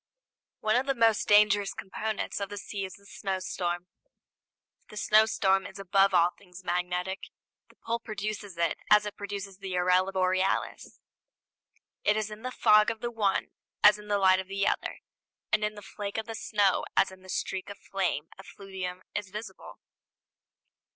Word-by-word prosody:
One 215 0 +2
of 260 +2 0
the 275 - +1
most 225 -3 +3
dangerous 205 -1 +5
components 215 +3 -3
of 200 -1 -3
the 205 - -6
sea 200 0 -4
is 185 - -8
the 200 - -19
snowstorm. 185 -3 -3 1.0
The 210 - -10
snowstorm 210 -3 +3
is 190 - -11
above 195 0 +3
all 175 0 +5
things 180 -1 -14
magnetic. 180 +2 -1 0.5
The - - -22
pole 230 +1 -3
produces 210 -4 -5
it 170 0 0
as 210 0 +6
it 210 - -5
produces 200 -1 -6
the 190 -2 -3
aurora 180 +1 +3
borealis. 185 0 0 1.0
It 210 - +3
is 215 -1 -2
in 210 +1 -8
the 255 - -3
fog 210 -4 +5
of 225 -1 -4
the 240 0 -2
one 210 -4 0 0.3
as 210 0 +7
in 210 - -12
the 205 -1 +2
light 190 -1 +5
of 190 - -5
the 195 +1 -1
other; - - -1 0.5
and 215 0 +3
in 210 0 -1
the 205 - -10
flake 200 +1 -6
of 220 0 -3
snow 205 -4 +2
as 195 - +4
in 190 0 -14
the 185 - -15
streak 190 +1 -3
of 200 - -8
flame 180 -6 -2
effluvium 190 -2 -7
is 205 -2 -3
visible. 210 +3 -8
200 Hz, 170 wpm, -29 LUFS, 185-210 Hz, 1.0 s, as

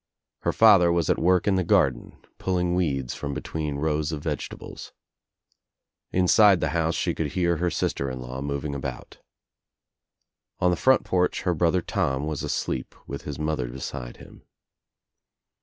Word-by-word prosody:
Her - - 0
father 100 -6 +6
was 85 -2 +1
at - - 0
work 90 +1 +3
in 95 -2 +3
the 95 - +1
garden, 80 - +1 0.2
pulling 90 -2 0
weeds 70 -8 -1
from 70 -1 -5
between 75 -3 -4
rows 75 +1 -1
of 75 -2 -5
vegetables. - - -6 1.2
Inside 95 +1 +5
the - - 0
house 80 -1 0
she - - 0
could 75 -3 -3
hear 85 -2 +1
her 90 +2 0
sister 70 -4 -1
in 65 0 -5
law 65 +1 -6
moving 70 +1 -3
about. 70 -2 -6 1.4
On 90 - +3
the - - +2
front 130 +9 +3
porch 90 -1 0
her 90 - +1
brother 85 +2 +1
Tom 75 -10 -1
was 75 -2 -3
asleep 65 - -3
with 70 - -7
his 75 - -5
mother 75 -5 -2
beside - - -7
him. - - -15
80 Hz, 155 wpm, -25 LUFS, 70-90 Hz, 1.4 s, father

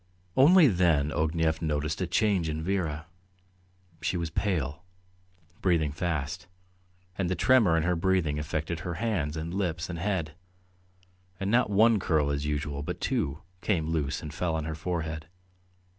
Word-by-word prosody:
Only 160 +5 +7
then 85 - +2
Ognev 80 0 0
noticed 75 +1 -1
a 90 - 0
change 95 -4 +1
in 80 0 -3
Vera. 80 -5 -1 1.0
She 85 +2 -1
was 85 -2 -3
pale, 80 -6 -1 0.8
breathing 80 -5 +2
fast, 75 -3 -3 0.7
and 90 -3 0
the 95 - 0
tremor 110 -10 +4
in 80 - +1
her 90 +1 +1
breathing 85 -4 +1
affected 80 +2 -3
her 85 +2 -4
hands 85 -10 -1
and 80 +2 -4
lips 90 -3 -2
and 85 - -5
head, 90 -4 -1 1.1
and 95 +1 -1
not 120 -1 +3
one 110 +2 +5
curl 75 -5 +1
as 70 +1 -2
usual, 75 -1 -2
but 75 - -5
two, 70 +5 -1 0.2
came 80 -6 0
loose 75 -3 -1
and 75 -1 -6
fell 80 0 -1
on 80 -1 -2
her 80 - -3
forehead. 80 -1 -4
80 Hz, 155 wpm, -28 LUFS, 75-95 Hz, 1.1 s, Only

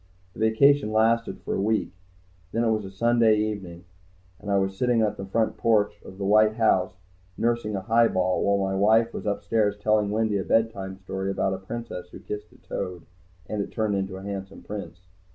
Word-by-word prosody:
The - - -13
vacation 110 +3 +4
lasted 115 +1 +1
for - - -3
a - - -1
week. 110 0 0 0.6
Then 115 - 0
it 115 - +2
was 110 -2 -1
a - - -7
Sunday 115 +1 +3
evening, 95 -5 -4 0.5
and 105 - -8
I 100 - +3
was 95 0 0
sitting 120 +1 +2
on 105 - +1
the 95 - -7
front 110 +2 0
porch 110 -3 +1
of 95 - -11
the 100 - -3
white 110 +2 +4
house 95 -5 +2 0.4
nursing 115 -2 0
a 95 - -2
highball 95 -4 +2
while 100 -1 +1
my - - -1
wife 110 +4 +3
was - - -5
upstairs 105 0 0
telling 105 0 +2
Wendy 110 -1 0
a - - -2
bedtime 100 -4 0
story 95 0 -4
about 95 0 0
a 95 - -4
princess 95 -3 -7
who - - -11
kissed 105 -4 -7
a - - -19
toad, 90 -2 -6 0.4
and 105 -1 -2
it - - -5
turned 110 -2 -1
into 95 -1 -2
a 95 - -9
handsome 100 -1 -6
prince. 100 -4 -7
105 Hz, 200 wpm, -25 LUFS, 95-110 Hz, 0.6 s, vacation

